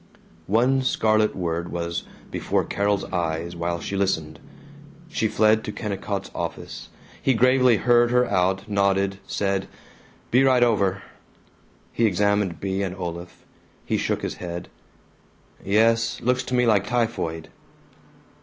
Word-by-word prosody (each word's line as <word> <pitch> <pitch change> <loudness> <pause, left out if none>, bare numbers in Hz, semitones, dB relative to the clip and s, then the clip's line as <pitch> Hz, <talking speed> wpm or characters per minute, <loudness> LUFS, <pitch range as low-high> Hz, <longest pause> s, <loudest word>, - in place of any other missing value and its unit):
One 125 +6 +3
scarlet 110 -4 +2
word 85 -1 -3
was 85 0 -3 0.3
before - - 0
Carol's 100 0 0
eyes 85 -1 -2
while 85 0 -2
she 100 - -5
listened. 80 -6 -1 0.7
She - - 0
fled 110 0 +3
to 105 - -4
Kennicott's 100 -2 -4
office. - - -6 0.3
He 135 - +2
gravely 125 0 +4
heard 120 +3 +4
her 125 +1 +3
out; 95 -1 0
nodded, 100 -1 +1
said, 100 -1 -1 0.6
"Be 125 +3 +5
right 130 -2 +4
over." 100 -5 +1 0.9
He 115 - +3
examined 100 -2 +1
Bea 95 0 -2
and 95 -2 -3
Olaf. 85 -1 -7 0.4
He - - 0
shook - - -1
his - - -4
head. 85 0 -6 0.9
"Yes. 115 +3 +2
Looks 125 +2 +1
to 125 - -2
me 125 0 +3
like 105 -4 +3
typhoid." 110 -10 -2
100 Hz, 130 wpm, -24 LUFS, 90-115 Hz, 0.9 s, Be